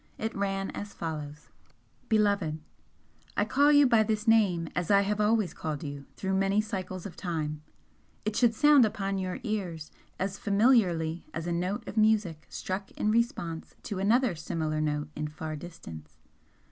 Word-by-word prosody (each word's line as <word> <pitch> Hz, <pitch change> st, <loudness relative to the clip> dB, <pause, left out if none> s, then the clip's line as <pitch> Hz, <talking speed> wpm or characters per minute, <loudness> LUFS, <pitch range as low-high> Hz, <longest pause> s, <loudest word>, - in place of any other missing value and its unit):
It 220 Hz, +1 st, -3 dB
ran 195 Hz, -1 st, -1 dB
as 205 Hz, 0 st, -7 dB
follows: 150 Hz, -2 st, -6 dB, 0.6 s
Beloved, 200 Hz, -8 st, +2 dB, 0.8 s
I -, -, +3 dB
call 285 Hz, +1 st, +4 dB
you 290 Hz, -1 st, +7 dB
by 235 Hz, -4 st, +5 dB
this 215 Hz, 0 st, -1 dB
name 195 Hz, -7 st, +4 dB
as 175 Hz, 0 st, -1 dB
I 200 Hz, -1 st, +6 dB
have 210 Hz, +1 st, 0 dB
always 210 Hz, -4 st, +2 dB
called 155 Hz, -2 st, -4 dB
you 140 Hz, -2 st, -7 dB
through 190 Hz, 0 st, -2 dB
many 195 Hz, +1 st, +2 dB
cycles 185 Hz, -4 st, -4 dB
of 195 Hz, -, -7 dB
time, 155 Hz, -4 st, -3 dB, 0.6 s
it 215 Hz, 0 st, -1 dB
should 235 Hz, -2 st, +3 dB
sound 295 Hz, 0 st, +6 dB
upon 195 Hz, -2 st, -1 dB
your 185 Hz, -1 st, -3 dB
ears 185 Hz, -9 st, -3 dB, 0.3 s
as 190 Hz, +1 st, -3 dB
familiarly 200 Hz, -7 st, +2 dB
as 165 Hz, 0 st, -3 dB
a 175 Hz, -, -2 dB
note 180 Hz, +4 st, -2 dB
of -, -, -7 dB
music 210 Hz, -8 st, +2 dB
struck 190 Hz, +1 st, -4 dB
in 210 Hz, -, 0 dB
response 225 Hz, -, -1 dB
to 205 Hz, -4 st, -4 dB
another 230 Hz, +3 st, +3 dB
similar 155 Hz, -1 st, -2 dB
note 150 Hz, -1 st, -1 dB
in 150 Hz, -, -2 dB
far 155 Hz, +1 st, -6 dB
distance. 80 Hz, -, -10 dB
195 Hz, 160 wpm, -29 LUFS, 160-215 Hz, 0.8 s, you